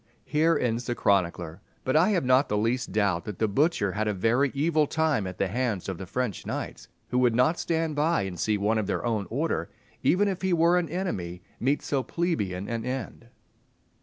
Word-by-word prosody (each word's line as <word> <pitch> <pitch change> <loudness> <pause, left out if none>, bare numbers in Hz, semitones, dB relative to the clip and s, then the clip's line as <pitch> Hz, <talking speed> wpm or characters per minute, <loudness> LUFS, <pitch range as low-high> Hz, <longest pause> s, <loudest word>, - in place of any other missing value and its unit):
Here 160 +3 +2
ends 120 0 -1
the 120 - -2
chronicler; 90 -4 0 0.2
but 130 - 0
I 165 +6 +5
have 180 -9 +1
not 130 +2 +4
the 105 - +1
least 115 +4 0
doubt 100 -6 +1
that 105 - -6
the 110 - +1
butcher 105 - +1
had 110 +3 -1
a 105 - 0
very 120 +8 +2
evil 155 +1 +2
time 155 -11 +1
at 90 0 -7
the 100 - +1
hands 110 -2 -2
of 95 -3 -4
the 95 - -7
French 125 -4 -2
knights, - - -5 0.2
who 125 - +1
would 120 -2 +3
not 130 +8 +3
stand 165 -2 -1
by 155 -2 +2
and 95 -2 -5
see 105 -1 +1
one 105 +2 +1
of 105 - -2
their 105 - -2
own 110 -4 -1
order, 125 - -1 0.3
even 205 +4 +3
if 190 -2 -2
he 190 -1 +1
were 170 +1 +4
an 170 - -3
enemy, 95 - -3 0.2
meet 140 +4 +1
so 140 -2 0
plebeian 105 - -2
an 115 0 -3
end. 125 -2 -5
120 Hz, 210 wpm, -27 LUFS, 100-155 Hz, 0.3 s, I